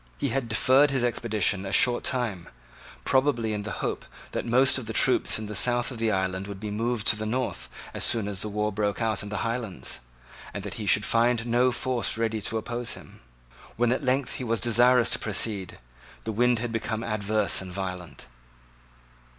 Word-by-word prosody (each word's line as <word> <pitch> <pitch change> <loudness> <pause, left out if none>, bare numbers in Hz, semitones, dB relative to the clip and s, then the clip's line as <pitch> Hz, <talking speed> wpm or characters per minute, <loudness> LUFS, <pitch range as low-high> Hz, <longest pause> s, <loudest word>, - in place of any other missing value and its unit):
He - - -1
had 135 -3 -2
deferred 130 +6 +4
his 135 -3 0
expedition 110 -5 +1
a 95 - -5
short 120 +4 +4
time, 105 -9 -1 0.6
probably 130 -5 +2
in 105 - -2
the 110 - -5
hope - - -3 0.3
that - - -3
most 130 +3 +4
of 120 - -8
the 110 - -4
troops - - +3
in 110 - -5
the 105 - -6
south 120 +5 +3
of 120 - -7
the 115 -1 +1
island 95 -1 -1
would 100 -1 -7
be 105 0 -5
moved 115 +1 -2
to - - +4
the 110 0 -4
north 125 +3 -3 0.2
as - - -2
soon 110 -4 +3
as 100 -2 -1
war 105 0 -1
broke 105 0 -1
out 110 -3 0
in 105 - -7
the 105 +2 -3
Highlands, 115 -4 -4 0.6
and - - -4
that - - -5
he 105 - -4
should 100 0 +4
find 115 +2 +2
no 120 +2 +3
force 125 -2 -1
ready 110 -1 -1
to 110 - -2
oppose 120 +2 -3
him. - - -13 0.6
When 120 +1 +2
at 130 - -1
length 130 +1 0
he - - -3
was 115 -2 0
desirous 120 +1 +4
to - - +1
proceed, 100 -3 -2 0.5
the 110 - -3
wind 120 +2 +2
had 115 +1 -3
become 115 0 -3
adverse 105 -2 0
and 95 -1 -8
violent. 90 -4 -6
115 Hz, 200 wpm, -26 LUFS, 105-120 Hz, 0.6 s, deferred